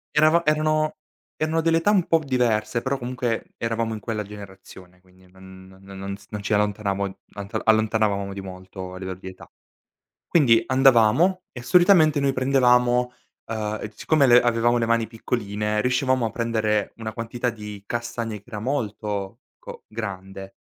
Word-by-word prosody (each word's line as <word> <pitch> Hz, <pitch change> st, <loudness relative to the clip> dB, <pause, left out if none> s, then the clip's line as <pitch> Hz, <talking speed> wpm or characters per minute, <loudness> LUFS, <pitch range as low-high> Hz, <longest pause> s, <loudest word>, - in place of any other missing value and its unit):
Eravam 155 Hz, +3 st, +5 dB
erano 155 Hz, 0 st, +1 dB, 0.4 s
erano 155 Hz, +1 st, +1 dB
delle 165 Hz, 0 st, +3 dB
età 165 Hz, +5 st, +2 dB
un 190 Hz, -5 st, +2 dB
po' 165 Hz, -, +4 dB
diverse, 120 Hz, -3 st, 0 dB
però 140 Hz, +1 st, -1 dB
comunque 125 Hz, -2 st, -3 dB
eravamo 115 Hz, 0 st, -2 dB
in 110 Hz, -, -5 dB
quella 110 Hz, -1 st, -3 dB
generazione, 95 Hz, -3 st, -13 dB
quindi 95 Hz, 0 st, -23 dB
non 95 Hz, 0 st, -14 dB
non 95 Hz, 0 st, -11 dB
non 100 Hz, +1 st, -5 dB
z 100 Hz, 0 st, -20 dB
non 105 Hz, -1 st, -5 dB
ci 105 Hz, +1 st, -2 dB
allontanavon 100 Hz, -2 st, -1 dB, 0.2 s
antal 100 Hz, -1 st, -5 dB
allontanavamo 110 Hz, -3 st, +1 dB
di 100 Hz, -, -6 dB
molto 95 Hz, 0 st, -9 dB
a -, -, -8 dB
livello 95 Hz, 0 st, -6 dB
di 95 Hz, -, -10 dB
età. 95 Hz, -, -11 dB, 0.8 s
Quindi 115 Hz, -9 st, +4 dB
andavamo 135 Hz, -, +4 dB
e 120 Hz, -, -8 dB
solitamente 160 Hz, +1 st, +5 dB
noi 140 Hz, -1 st, +2 dB
prendevamo, 125 Hz, -2 st, +3 dB, 0.3 s
ehm, 110 Hz, -1 st, -3 dB
e 105 Hz, -, -5 dB
siccome 155 Hz, +2 st, +2 dB
le 120 Hz, -1 st, +7 dB
avevamo 120 Hz, 0 st, +2 dB
le 115 Hz, -, 0 dB
mani 115 Hz, 0 st, +1 dB
piccoline, 105 Hz, -2 st, -2 dB
riuscivamo 130 Hz, 0 st, +1 dB
a -, -, -3 dB
prendere 110 Hz, -3 st, -1 dB
una 110 Hz, -1 st, -6 dB
quantità 120 Hz, +2 st, -3 dB
di 105 Hz, -3 st, -9 dB
castagne 115 Hz, -1 st, -4 dB
che 100 Hz, -, -24 dB
era 110 Hz, -3 st, -6 dB
molto, 105 Hz, -4 st, -3 dB
ecco, -, -, -12 dB
grande. 95 Hz, -3 st, -7 dB
115 Hz, 160 wpm, -23 LUFS, 100-125 Hz, 0.8 s, le